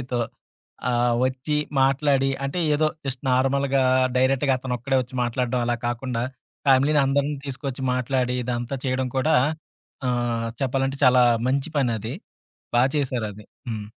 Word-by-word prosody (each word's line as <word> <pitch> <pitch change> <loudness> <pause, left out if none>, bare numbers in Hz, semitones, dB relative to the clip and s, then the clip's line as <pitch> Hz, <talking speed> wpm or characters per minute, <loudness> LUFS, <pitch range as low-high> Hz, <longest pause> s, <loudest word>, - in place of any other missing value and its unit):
ఫ్యామిలీ‌‌తో 125 -1 -2 0.7
ఆహ్, 120 0 +2
వచ్చి 130 +4 -1 0.3
మాట్లాడి. 135 0 +2
అంటే 140 +6 -2 0.2
ఏదో 155 +1 +2 0.2
జస్ట్ 135 -2 -3
నార్మల్‌గా, 135 +1 +2 0.3
డైరెక్ట్‌గా 135 +1 +3
అతనొక్కడే 130 +1 -1
ఒచ్చి 125 +1 -13
మాట్లాడడం 125 +1 -1
అలా 120 0 +1
కాకుండా 120 0 -2 0.5
ఫ్యామిలీ‌ని 140 +3 +5
అందరిని 140 +2 +1
తీసుకొచ్చి 135 -1 -5
మాట్లాడి 125 0 0
ఇదంతా 120 +2 -3
చేయడం 130 0 0
కూడా 155 +4 +2 0.7
ఆహ్, 120 -2 0 0.2
చెప్పాలంటే 135 +1 0
చాలా 125 -1 +6 0.3
మంచి 140 +3 0
పనది. 115 -3 -1 0.6
బా 120 - +5
చేసారది. 115 -7 -2 0.2
హ్మ్. 110 -2 -4
130 Hz, 125 wpm, -24 LUFS, 120-135 Hz, 0.7 s, చాలా